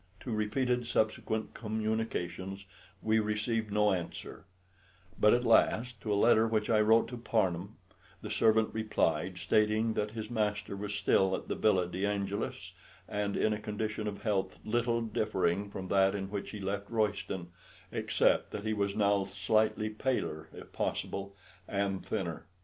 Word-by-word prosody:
To 125 - -5
repeated 120 +3 0
subsequent 110 -1 0
communications 105 -4 -3 0.4
we 110 0 +3
received 110 +1 -1
no 105 -1 +3
answer; 90 +1 -5 0.7
but 105 - +6
at 120 0 +3
last, 115 0 +3
to 110 - -3
a - - +3
letter 110 +1 +5
which 110 0 0
I 110 -1 +5
wrote 110 +2 +5
to 125 - -6
Parnham, 100 -4 0 0.5
the - - -5
servant 110 0 +3
replied, 95 -5 0
stating 110 +4 +2
that 105 -1 -1
his 110 0 -5
master 105 -3 -1
was 100 +1 -4
still 95 -1 +3
at - - -7
the - - -1
Villa 95 -5 +2
de 90 +2 -4
Angelis, 100 0 -2 0.3
and 105 -1 -2
in 110 - +2
a 105 - -3
condition 105 0 -3
of 100 -1 -5
health 95 -4 0
little 120 +1 +1
differing 100 -3 0
from 95 -2 -6
that 95 0 +4
in 95 -1 -4
which 100 -1 -4
he 105 - -7
left 100 +1 -3
Royston, 100 -5 -1 0.4
except - - +2
that 105 - -6
he 110 - +1
was 100 -1 -1
now 100 -1 +3
slightly 110 +1 +1
paler 105 - -2
if - - -12
possible 100 0 -3 0.3
and 100 -1 -1
thinner. 90 -6 -3
105 Hz, 155 wpm, -31 LUFS, 100-110 Hz, 0.7 s, but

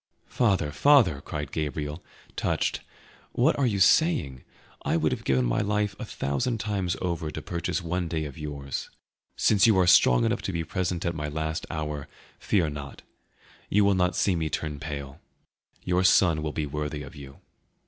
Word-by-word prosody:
"Father, 95 -11 +1
father!" 100 - +4
cried 75 -2 -5
Gabriel, 75 +1 -3 0.3
touched, - - -1 0.5
"what 135 +7 +3
are 135 - +3
you 105 -4 0
saying? 100 - +3 0.4
I - - 0
would 80 -1 +1
have - - -3
given 65 -2 +2
my - - +1
life 105 -1 0
a - - -4
thousand 110 - -2
times 100 -5 -2
over 85 -3 -2
to - - -6
purchase 85 0 -3
one 90 +1 -2
day 80 -2 -2
of 70 -3 -8
yours. 70 -3 -5 0.5
Since 105 0 +4
you 110 -4 +4
are 95 - +4
strong 60 -8 +5
enough - - 0
to - - -3
be 85 -2 -2
present 90 +1 -2
at 85 - 0
my 75 -2 -4
last 80 +1 -3
hour, 75 -2 -4 0.3
fear 90 -6 +1
not; 70 -1 -7 0.7
you 105 0 +4
will 100 - +4
not 90 -1 +1
see 95 - +2
me 80 -2 -1
turn 75 -1 -3
pale; 70 -1 -6 0.6
your 90 0 +1
son 90 -3 +4
will 75 -1 -2
be 75 0 -2
worthy 75 0 -4
of - - -11
you." 70 -1 -11
80 Hz, 180 wpm, -26 LUFS, 75-95 Hz, 0.7 s, strong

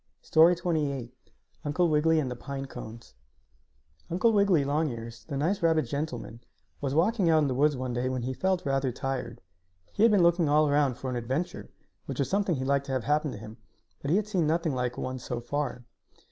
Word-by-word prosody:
STORY 165 +2 +6
XXVIII 150 -8 -2 0.5
UNCLE 155 +4 +1
WIGGILY 160 +1 +3
AND 130 -4 -2
THE - - -4
PINE 135 +2 -6
CONES 115 - -10 1.0
Uncle 205 +7 +2
Wiggily 200 -7 +4
Longears, 120 -6 -3
the 140 -3 -4
nice 185 +8 0
rabbit 160 -2 +3
gentleman, 125 -3 -5 0.4
was 135 -2 -1
out - - 0
walking 195 +2 +2
in 155 -3 +4
the 130 - -1
woods 145 +2 +2
one 130 -1 -3
day 125 +1 -1
when 130 -2 -2
he 130 +2 -2
felt 185 +4 0
rather 135 -1 0
tired. 125 -2 -4 0.5
He - - -2
had 230 0 +6
been 200 -4 +4
looking 170 -2 +3
all 150 +1 +4
around 145 -3 +2
for 130 +1 -5
an - - -3
adventure, 130 +8 -3 0.4
which - - -5
was 135 -2 -1
something 195 -3 +1
he 130 -1 -3
liked 140 +1 +1
to 135 - -3
have 130 -3 -1
happen 150 +1 +1
to - - -7
him, 110 +2 -10 0.4
but 140 - -4
he 165 - +3
had 210 - 0
seen 185 -7 +1
nothing 165 -1 +1
like 125 -1 -2
one 130 0 -4
so 120 -1 -4
far. 125 0 -3
145 Hz, 205 wpm, -28 LUFS, 130-165 Hz, 1.0 s, STORY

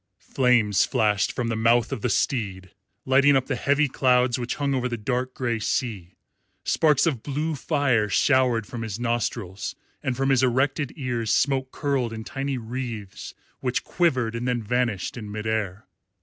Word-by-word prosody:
Flames 120 -7 +2
flashed 105 -2 +1
from 120 -2 -2
the 115 - -1
mouth 115 +1 +3
of - - -3
the 125 - 0
steed, 95 -8 -1 0.3
lighting 140 +2 +5
up 130 -1 +2
the 135 - -2
heavy 140 +4 +2
clouds 125 -2 +2
which 120 0 -3
hung 140 -1 -1
over 125 -1 0
the 120 - -3
dark 125 +3 -2
grey 120 -3 -1
sea, 105 -5 -2 0.5
sparks 150 -4 +3
of 140 -9 0
blue 150 +4 -2
fire 135 -7 +1
showered 125 -1 +3
from 120 +3 -7
his 110 -1 -4
nostrils, 115 -5 -2 0.3
and 130 -2 -2
from 135 0 +1
his 130 -2 +4
erected 130 +3 +1
ears 120 -6 -2
smoke 130 +1 +1
curled 135 -5 -1
in 110 0 -6
tiny 135 +2 -3
wreaths 115 -4 -6 0.2
which 125 -1 -1
quivered 130 -10 +1
and 115 +1 -3
then 120 -2 0
vanished 120 -2 -1
in 105 -3 -7
mid 105 +1 -5
air. 110 -3 -2
125 Hz, 170 wpm, -25 LUFS, 110-135 Hz, 0.5 s, lighting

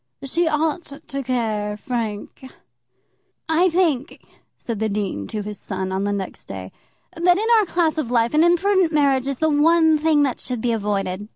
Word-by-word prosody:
"She 330 +5 0
ought 310 -1 -1
to 275 0 -3
care, 220 -5 -2
Frank." 230 +2 -5 1.0
"I 330 +3 +3
think," 320 -7 0 0.4
said 230 -4 -5
the 220 0 0
dean 200 - -3
to 210 -1 -4
his 210 0 -7
son, 190 -1 -4
on 190 +1 -1
the 205 - 0
next 195 -2 -5
day, 95 -1 -8 0.4
"that 355 +2 +3
in 435 +3 -1
our 425 - +2
class 325 -2 +1
of 270 -7 -3
life 235 0 +1
an 305 +2 +4
imprudent 350 0 +3
marriage 275 -4 +2
is 275 -2 -2
the 315 +3 +1
one 320 +1 +4
thing 305 -1 +3
that 265 -4 -1
should 250 -2 -4
be 235 +1 0
avoided. 205 -2 -2
265 Hz, 180 wpm, -21 LUFS, 210-320 Hz, 1.0 s, an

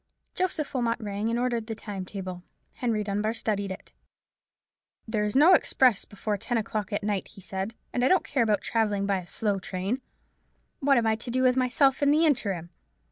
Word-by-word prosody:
Joseph 355 -5 -2
Wilmot 235 -3 0
rang, 210 0 -2
and 230 - 0
ordered 240 -2 -1
the 225 - -4
time 200 -3 -6
table; 185 -2 -6 0.3
Henry 225 -4 -1
Dunbar 210 +2 -1
studied 200 -3 -1
it. 190 - -8 1.1
"There 220 -1 0
is 210 - -3
no 310 +7 +7
express 250 - +3
before 205 +1 -3
ten 240 +4 -1
o'clock 215 -2 -3
at 205 - -2
night," 205 -2 -1
he 205 - -14
said; 190 +4 -4 0.2
"and 245 - 0
I - - +5
don't 370 0 +4
care 280 -6 0
about 215 -4 +2
travelling 210 -3 0
by 200 -1 +1
a 175 - -11
slow 205 -1 -1
train. 190 +7 -3 0.8
What 275 -1 +4
am 235 - +2
I 220 0 +3
to 240 +2 -6
do 255 +2 +1
with 250 -1 +4
myself 265 +2 +3
in 285 - +4
the 310 +3 +4
interim?" 195 - 0
220 Hz, 195 wpm, -27 LUFS, 200-250 Hz, 1.1 s, no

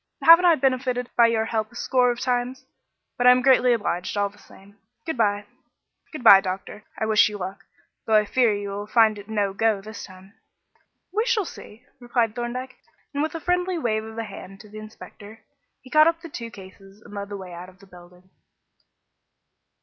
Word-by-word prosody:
"Haven't 335 +2 +8
I 340 -2 +6
benefited 255 -2 -1
by 235 -1 +6
your 225 -1 0
help 220 -1 -3
a - - -18
score 250 +1 +1
of 240 0 -2
times? 250 +1 -2 0.5
But 245 - +3
I - - +10
am 250 0 +5
greatly 255 -1 +4
obliged 205 -4 -2
all 200 0 +1
the 205 +1 -21
same. 200 +2 -19 0.3
Good 320 - -3
bye." 205 -3 0 0.7
"Good 305 -6 -8
bye, 195 -4 +9
doctor. 195 +2 -6
I - - -1
wish 215 0 +4
you 210 - -7
luck, 195 +1 -7 0.4
though 220 - +3
I 215 0 +4
fear 240 +1 +2
you 205 -1 -4
will 205 +1 -6
find 220 -2 +3
it 205 +1 -13
'no 205 -3 -1
go' 220 0 +1
this 215 +3 -10
time." 185 +1 -14 0.8
"We 435 +2 +1
shall 450 -5 +1
see," 235 -5 -12
replied 240 -3 -1
Thorndyke, 245 +2 -5 0.4
and 285 - -1
with 315 +1 -2
a - - -3
friendly 360 +2 -1
wave 220 -7 -1
of 220 0 -10
the 230 - -4
hand 195 -2 -11
to 210 - -16
the 215 +1 -10
inspector 215 0 -13 0.4
he 255 - -17
caught 310 +1 +6
up 330 0 0
the 335 - -10
two 230 -5 -7
cases 195 0 -15
and - - -14
led 200 0 -6
the 205 - -6
way 185 -2 -10
out 175 +2 -9
of 185 - -20
the 195 - -18
building. 180 0 -18
220 Hz, 205 wpm, -23 LUFS, 200-250 Hz, 0.8 s, I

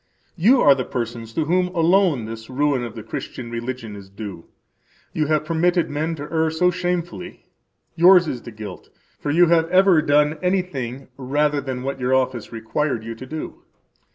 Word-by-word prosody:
[You 225 +9 +4
are 140 - +7
the 135 -1 -2
persons 115 -2 -5
to 160 - 0
whom 180 +3 +2
alone 170 - +3
this 115 +1 -8
ruin 140 -1 0
of 120 -1 -7
the 110 - -7
Christian 115 +2 -6
religion 120 -2 -5
is 100 -1 -11
due. 100 -4 -8 0.7
You 155 -2 0
have 155 0 +1
permitted 170 +1 +1
men 155 +3 -2
to 145 - -7
err 160 +1 0
so 180 +3 +2
shamefully; 180 0 -4 0.5
yours 175 +1 +6
is 125 -5 -4
the 120 - -9
guilt; 105 -4 -9 0.3
for 145 - -4
you 170 +4 +5
have 165 -1 +3
ever 185 -2 +5
done 150 0 +2
anything 140 -10 -2
rather 145 +2 0
than 130 -2 -5
what 135 0 -3
your 130 +1 +1
office 130 -4 -1
required 115 +2 -2
you 115 +1 -5
to 130 +3 -10
do. 155 +3 -7
145 Hz, 180 wpm, -22 LUFS, 120-170 Hz, 0.7 s, are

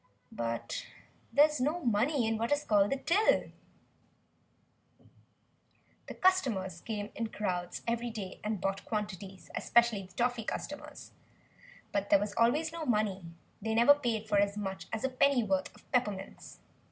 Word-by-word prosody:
But 115 0 -4 0.4
there 290 +1 +7
is 300 -3 -2
no 300 +7 +1
money 240 +4 +2
in 220 0 0
what 230 +3 -1
is 290 0 +2
called 205 -4 +3
the 275 - +1
"till." 340 +10 +2 2.6
The - - -7
customers 220 - +1
came 210 -2 -4
in 230 - -2
crowds 180 -5 -3
every 235 +1 -1
day 205 -5 -6
and 210 -1 -2
bought 195 +1 -2
quantities, 200 -3 -5
especially 235 -4 +3
the 185 -1 -13
toffee 240 +2 0
customers. - - -6 0.8
But 200 0 -1
there 200 - +7
was 205 +1 -3
always 280 +9 +2
no 335 -1 -4
money; 210 - 0 0.4
they 220 +1 -1
never 235 +5 +8
paid 235 -6 -2
for 205 -2 +3
as 200 0 +1
much 195 -2 -4
as 220 - -3
a 265 - +1
pennyworth 245 -8 +2
of - - -21
peppermints. 210 -7 -2
220 Hz, 150 wpm, -31 LUFS, 200-250 Hz, 2.6 s, never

